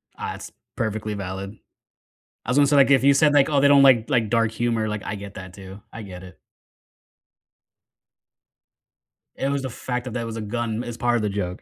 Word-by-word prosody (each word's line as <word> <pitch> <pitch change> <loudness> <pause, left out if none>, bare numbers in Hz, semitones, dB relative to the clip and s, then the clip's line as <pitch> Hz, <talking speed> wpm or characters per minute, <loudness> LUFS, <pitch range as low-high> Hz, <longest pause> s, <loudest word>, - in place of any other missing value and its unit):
Ah, - - -5
that's - - -10 0.2
perfectly 110 0 -3
valid. 100 +1 -6 0.9
I - - -4
was 125 - +1
gonna 145 - +5
say, 145 +1 +2
like, 140 -1 +5
if 135 -1 +4
you 140 0 +6
said, 150 +1 +4
like, 145 -2 +4
"Oh, 145 -2 +2
they 140 - +5
don't 140 -1 +6
like 130 -2 +4
like 115 -5 +1
dark 115 -1 +2
humor," 115 -1 -1
like, 105 -1 -4
I - - -4
get 100 0 -9
that 95 0 -10
too, 95 0 -11
I 115 - -8
get 90 -3 -10
it. 90 -1 -14 3.0
It 135 - -2
was 140 0 -1
the 130 - -4
fact 125 +1 -5
that 125 - -6
there 120 -1 -3
was 115 0 -6
a 115 - -4
gun 115 +1 -3
as 120 -1 -7
part 120 0 +1
of 115 - 0
the 105 - -1
joke, 90 -3 -4
115 Hz, 215 wpm, -23 LUFS, 105-130 Hz, 3.0 s, you